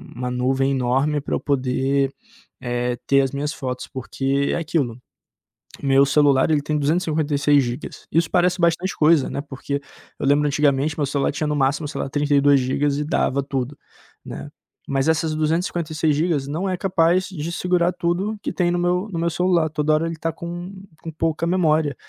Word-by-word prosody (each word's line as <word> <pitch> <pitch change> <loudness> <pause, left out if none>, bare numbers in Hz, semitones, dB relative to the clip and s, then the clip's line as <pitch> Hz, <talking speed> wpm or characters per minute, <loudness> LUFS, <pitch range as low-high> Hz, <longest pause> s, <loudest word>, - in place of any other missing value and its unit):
uma 125 +1 -3
nuvem 130 +2 +1
enorme 135 +3 +1
pra - - -5
eu - - -1
poder, 135 0 0 0.5
eh, 120 -1 -1
ter 140 - +4
as 135 -1 -1
minhas 145 +2 -2
fotos, 125 -3 -5
porque 135 +2 -1
é - - +1
aquilo, 155 -8 -1 0.9
meu 135 0 +5
celular 140 -1 +3
ele 150 -2 +3
tem 150 +1 -1
256 145 -2 +2
gigas. 120 +4 -6
Isso 165 0 +2
parece 180 0 +2
bastante 170 +2 +1
coisa, 155 -2 +4
né? - - -3
Porque 140 0 -5 0.4
eu - - -2
lembro 145 +2 +3
antigamente, 145 +1 +1
meu 145 - +1
celular 140 0 0
tinha 150 +2 -2
no 150 - 0
máximo, 140 +2 +1
sei 145 -2 -5
lá, - - -2
32 145 0 +3
gigas 140 +3 0
e 150 - -1
dava 145 -3 0
tudo, 135 0 -4 0.5
né. - - -8 0.4
Mas 135 +1 +1
essas 160 0 +1
256 155 -1 0
gigas 150 -4 0
não 160 +7 -2
é 185 - -1
capaz 180 -1 +2
de 170 -3 -5
segurar 180 0 +1
tudo 180 +5 -1
que - - -2
tem 175 -2 +1
no 175 - 0
meu 180 +3 +1
no 165 - -3
meu 170 - +1
celular. 175 -2 +2
Toda 150 0 0
hora 155 +2 +2
ele 165 - -4
tá 165 +1 -2
com, 175 +3 -7 0.3
com 165 - -6
pouca 160 +1 -1
memória, 160 -5 +2
150 Hz, 180 wpm, -22 LUFS, 140-165 Hz, 0.9 s, meu